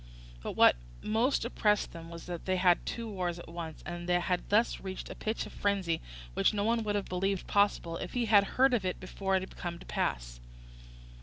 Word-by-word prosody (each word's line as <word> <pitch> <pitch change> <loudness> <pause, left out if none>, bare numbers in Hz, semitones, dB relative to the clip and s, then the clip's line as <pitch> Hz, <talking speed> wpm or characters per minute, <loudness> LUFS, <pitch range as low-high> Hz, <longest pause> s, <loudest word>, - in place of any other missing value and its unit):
But - - -4
what - - +6 0.3
most 230 +5 +2
oppressed 210 -3 +1
them 165 0 -9
was 170 -1 -9
that 175 -2 -6
they 185 - +1
had 180 -1 +4
two 230 -1 -3
wars 180 -5 -2
at 175 - -10
once, 165 -2 -7
and 175 0 -5
had 175 0 +1
thus 220 +3 +3
reached 190 -1 -6
a - - -7
pitch 220 +1 -2
of - - -10
frenzy 195 -5 0 0.3
which 210 - +2
no 200 - +1
one 230 +1 +2
would 205 -1 -1
have 205 - 0
believed 190 +1 -1
possible 200 -5 +2
if - - -6
he 245 -1 +1
had 205 -2 +6
heard 265 0 +5
of 230 -5 +2
it 185 -1 -2
before 190 +1 -1
it 190 - +2
had 190 - -10
come 170 -1 -4
to - - -13
pass. - - -2
190 Hz, 215 wpm, -31 LUFS, 175-210 Hz, 0.3 s, what